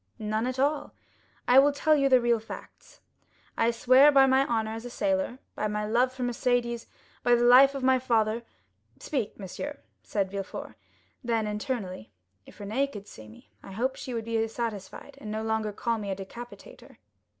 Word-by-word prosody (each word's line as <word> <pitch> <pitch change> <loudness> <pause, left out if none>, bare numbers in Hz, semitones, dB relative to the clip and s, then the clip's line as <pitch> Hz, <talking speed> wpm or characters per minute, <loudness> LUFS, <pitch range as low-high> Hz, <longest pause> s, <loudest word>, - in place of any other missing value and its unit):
"None 215 +2 -2
at 255 0 -3
all. 285 +3 0 0.5
I 250 +2 +7
will 285 +2 +5
tell 305 +2 +2
you 275 -2 +2
the 255 -1 +6
real 235 -1 +2
facts. 220 - -12 0.5
I 230 - +2
swear 255 +5 +6
by 270 -1 +6
my 265 +1 +3
honor 220 -2 -1
as 225 +1 -6
a 245 - -7
sailor, 285 0 -1 0.2
by 215 - -2
my 210 0 -2
love 240 +4 +2
for 260 -1 -6
Mercédès, 240 -1 -1 0.3
by 245 0 +4
the 240 - +1
life 260 +3 +7
of 270 - -4
my 260 0 +4
father——" 230 -2 +1 0.6
"Speak, 255 -8 -3
monsieur," 245 +9 -6 0.2
said 195 -2 -2
Villefort. 195 -1 -6 0.5
Then, 230 -2 0
internally, 210 - -4 0.4
"If - - -15
Renée 240 +8 -1
could 205 -4 -9
see 110 - -12
me, 110 - -17
I 195 - -11
hope 255 +6 -1
she 250 - -6
would 225 -1 -3
be 225 -1 0
satisfied, 230 +4 -6
and - - -8
would 215 - -3
no 220 - -3
longer 220 -1 -1
call 230 +2 -2
me 205 -1 -5
a 195 - -1
decapitator." 240 - -11
235 Hz, 185 wpm, -27 LUFS, 215-260 Hz, 0.6 s, I